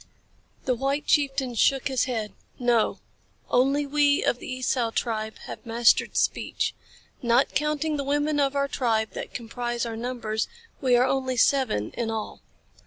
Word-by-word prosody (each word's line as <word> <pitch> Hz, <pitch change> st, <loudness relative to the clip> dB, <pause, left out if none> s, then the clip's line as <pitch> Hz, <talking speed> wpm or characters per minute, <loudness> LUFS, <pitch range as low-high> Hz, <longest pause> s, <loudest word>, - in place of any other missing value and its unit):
The 255 Hz, -, +2 dB
white 275 Hz, +4 st, -1 dB
chieftain 270 Hz, -3 st, +1 dB
shook 265 Hz, +3 st, +2 dB
his 265 Hz, -3 st, +1 dB
head. 225 Hz, -5 st, -3 dB, 0.2 s
"No. 240 Hz, -3 st, +2 dB, 0.5 s
Only 275 Hz, +4 st, +3 dB
we 285 Hz, 0 st, +3 dB
of 245 Hz, -, +1 dB
the -, -, -7 dB
Esau 255 Hz, -2 st, 0 dB
tribe 220 Hz, -1 st, -2 dB
have -, -, -8 dB
mastered 230 Hz, -1 st, +3 dB
speech. -, -, 0 dB, 0.5 s
Not 240 Hz, +2 st, +3 dB
counting 300 Hz, +1 st, 0 dB
the 280 Hz, -, -2 dB
women 290 Hz, +2 st, 0 dB
of 280 Hz, 0 st, +1 dB
our 280 Hz, 0 st, +1 dB
tribe 225 Hz, -5 st, 0 dB
that -, -, -7 dB
comprise 240 Hz, 0 st, -3 dB
our 230 Hz, -1 st, -4 dB
numbers 225 Hz, -2 st, -2 dB, 0.3 s
we 255 Hz, -3 st, +4 dB
are 245 Hz, +1 st, +5 dB
only 260 Hz, -1 st, 0 dB
seven 245 Hz, -, +2 dB
in 235 Hz, -2 st, -3 dB
all." 220 Hz, -1 st, -4 dB
255 Hz, 155 wpm, -26 LUFS, 230-275 Hz, 0.5 s, are